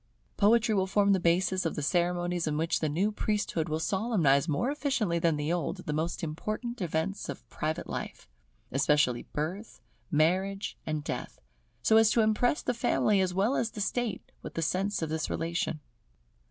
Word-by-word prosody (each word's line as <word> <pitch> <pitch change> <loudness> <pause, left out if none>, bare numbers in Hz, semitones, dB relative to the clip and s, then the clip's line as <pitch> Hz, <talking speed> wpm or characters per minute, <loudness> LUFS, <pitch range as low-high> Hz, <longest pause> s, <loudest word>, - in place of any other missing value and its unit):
Poetry 225 +2 +4
will 190 -2 +1
form 200 +1 +3
the 190 - +2
basis 185 +2 +2
of 165 - -2
the 150 - -3
ceremonies 175 +1 0
in 150 -1 0
which 160 +1 +1
the 155 - 0
new 185 +8 +1
priesthood 205 -6 -1
will 155 +1 -1
solemnise 165 - +2
more 235 - +1
efficiently 240 - 0
than 165 -1 +2
the 150 +3 -1
old, 175 -4 -3
the 150 - -2
most 160 +3 -2
important 215 +9 -4
events 170 +3 -2
of - - -7
private 155 +1 -2
life: - - -6 0.4
especially 135 -2 +2
Birth, 180 +9 -4 0.3
Marriage, 190 +6 +1
and 155 -1 -2
Death; - - -5 0.4
so 220 - +5
as 225 -1 +6
to 230 - +3
impress 220 +5 +2
the - - 0
family 210 -3 +2
as 180 -1 -1
well 210 +8 +2
as 235 - 0
the 220 - -9
state 230 +1 -2
with - - -8
the 165 - -1
sense 190 +2 0
of 160 - -2
this 160 0 -2
relation. 165 -2 -2
180 Hz, 180 wpm, -29 LUFS, 160-210 Hz, 0.4 s, as